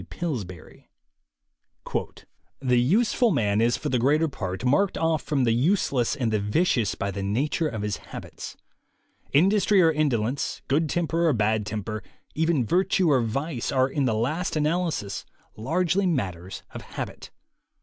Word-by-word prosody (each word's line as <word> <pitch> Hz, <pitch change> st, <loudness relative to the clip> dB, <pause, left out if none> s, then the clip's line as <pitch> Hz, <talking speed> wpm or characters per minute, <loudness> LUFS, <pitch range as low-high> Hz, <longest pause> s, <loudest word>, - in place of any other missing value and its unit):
B. -, -, -13 dB
Pillsbury: 105 Hz, -, -6 dB, 1.7 s
"The 125 Hz, -2 st, +2 dB
useful 225 Hz, -, +3 dB
man 110 Hz, -, +1 dB
is 120 Hz, +1 st, +2 dB
for -, -, -3 dB
the 125 Hz, -, +1 dB
greater 150 Hz, +6 st, +3 dB
part 95 Hz, -6 st, -5 dB
marked 185 Hz, +10 st, +2 dB
off 160 Hz, -2 st, +1 dB
from 140 Hz, -4 st, 0 dB
the 115 Hz, -, +3 dB
useless 130 Hz, -, +1 dB
and 120 Hz, -6 st, -1 dB
the 105 Hz, -, +2 dB
vicious 110 Hz, -, +1 dB
by 100 Hz, -, -2 dB
the 100 Hz, +1 st, -5 dB
nature 130 Hz, +11 st, 0 dB
of 110 Hz, -7 st, -4 dB
his 105 Hz, -1 st, -2 dB
habits. -, -, -9 dB, 0.7 s
Industry 195 Hz, +5 st, +4 dB
or 165 Hz, -3 st, +6 dB
indolence, 135 Hz, -5 st, -1 dB
good 150 Hz, +3 st, +1 dB
temper 170 Hz, 0 st, +1 dB
or 155 Hz, -, +4 dB
bad 110 Hz, -1 st, +1 dB
temper, 110 Hz, +1 st, -4 dB, 0.3 s
even 160 Hz, -4 st, +1 dB
virtue 180 Hz, -, +2 dB
or 130 Hz, -3 st, +4 dB
vice, 125 Hz, +3 st, -2 dB
are 130 Hz, -1 st, +3 dB
in 140 Hz, 0 st, -1 dB
the 115 Hz, -3 st, +1 dB
last 155 Hz, +13 st, -1 dB
analysis 155 Hz, -, -1 dB, 0.3 s
largely 180 Hz, -, +1 dB
matters 95 Hz, -, -3 dB
of -, -, -6 dB
habit. -, -, -7 dB
135 Hz, 150 wpm, -25 LUFS, 110-165 Hz, 1.7 s, or